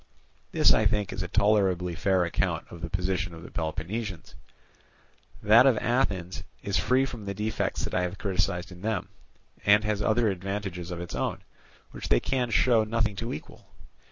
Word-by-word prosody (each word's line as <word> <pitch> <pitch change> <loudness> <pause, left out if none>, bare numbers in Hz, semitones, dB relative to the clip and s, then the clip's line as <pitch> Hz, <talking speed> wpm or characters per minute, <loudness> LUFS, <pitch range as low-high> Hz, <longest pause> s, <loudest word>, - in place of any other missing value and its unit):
"This, - - +5
I - - +4
think, 105 -3 -1
is - - -4
a - - -2
tolerably 95 -4 +2
fair 90 +2 +2
account 85 - -1
of 85 - -10
the 85 - -4
position 90 0 -2
of 80 - -11
the - - -11
Peloponnesians; 90 +4 -4 1.1
that 115 +5 +7
of 125 -5 +4
Athens 95 -8 0 0.2
is 100 -1 0
free 130 +1 +3
from 120 -6 -7
the 100 0 -4
defects 110 +2 -2
that - - -4
I 90 - +2
have 90 +2 -3
criticized 90 -2 -1
in 90 0 -11
them, 105 -2 -2 0.5
and 105 +1 +5
has 105 -1 -1
other 110 +1 +2
advantages 95 -2 -4
of 90 -1 -5
its 85 - -7
own, - - -2 0.5
which - - -7
they - - +5
can 125 -2 -1
show 115 0 +4
nothing 110 -1 0
to 115 +1 -3
equal. - - -9
100 Hz, 180 wpm, -27 LUFS, 90-110 Hz, 1.1 s, that